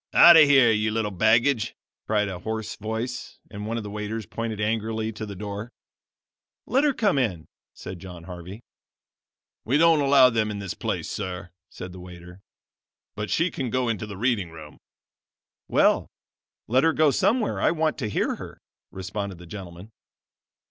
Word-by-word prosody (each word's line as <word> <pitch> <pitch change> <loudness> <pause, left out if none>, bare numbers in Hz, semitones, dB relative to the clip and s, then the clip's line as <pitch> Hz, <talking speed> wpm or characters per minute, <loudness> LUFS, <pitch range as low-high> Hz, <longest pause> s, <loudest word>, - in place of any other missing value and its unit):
"Out 170 0 +10
of 160 -2 +9
here, 135 -5 +6
you 110 0 +1
little 110 -1 -1
baggage!" 115 +4 +2 0.3
cried 105 -1 +1
a 95 -3 -5
hoarse 110 +2 -4
voice, 110 +4 -5
and 105 0 -6
one 115 +1 -2
of 115 - -4
the 105 - -7
waiters 105 +1 -4
pointed 115 +3 -4
angrily 110 +1 -1
to 110 0 -7
the 100 - -7
door. 100 +3 -6 1.0
"Let 265 +5 +2
her 295 - +4
come 200 -10 +2
in," 95 -11 -1 0.3
said 95 -1 -8
John 90 -2 -10
Harvey. 90 +5 -9 1.0
"We 130 +6 +2
don't 165 -1 +5
allow 135 -2 +6
them 110 -2 0
in 105 - -4
this 100 -2 -5
place, - - -3
sir," 95 -2 -5 0.2
said 90 - -8
the 90 - -10
waiter, 90 0 -12 0.8
"but 105 -1 -4
she 165 - +1
can 130 -3 -3
go 125 +1 0
into 110 -1 -2
the 100 -2 -8
reading 110 -5 0
room." 80 -2 -12 0.9
"Well, - - +3 0.6
let 130 +4 +3
her 165 0 +4
go 155 -2 +4
somewhere. 220 - +1
I - - +4
want 160 -2 0
to 110 - -2
hear - - -1
her," - - -9 0.3
responded 95 0 -5
the 90 - -12
gentleman. 90 +2 -10
110 Hz, 170 wpm, -25 LUFS, 95-125 Hz, 1.0 s, Out